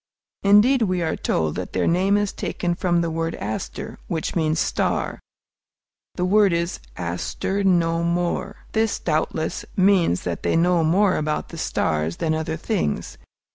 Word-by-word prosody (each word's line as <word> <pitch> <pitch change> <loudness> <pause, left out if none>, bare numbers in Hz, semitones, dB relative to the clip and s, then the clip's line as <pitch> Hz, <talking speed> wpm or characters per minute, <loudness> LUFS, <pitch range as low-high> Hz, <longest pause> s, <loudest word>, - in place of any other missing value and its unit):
Indeed, 210 +6 +5
we 185 -5 +1
are 160 - 0
told 80 -2 0
that - - -5
their - - +1
name 190 +4 +3
is 205 -1 -1
taken 175 -1 -2
from 175 -1 +1
the 170 -1 -1
word 165 +1 -2
aster, 105 +2 -5
which 160 -2 -3
means 160 -2 +1
"star;" - - -1 1.0
the 180 - 0
word 200 0 +4
is 170 +1 -1 0.2
"aster 90 - -2
know 170 -3 +2
more." 175 +3 -2
This, 220 -1 +1
doubtless, 160 0 -1
means 185 - +3
that 85 -2 -3
they - - +1
know 170 0 +3
more 185 +4 +3
about 155 0 -2
the - - -9
stars 80 +1 -1
than 160 -1 0
other 160 0 -2
things. 180 - -2
170 Hz, 155 wpm, -23 LUFS, 160-190 Hz, 1.0 s, Indeed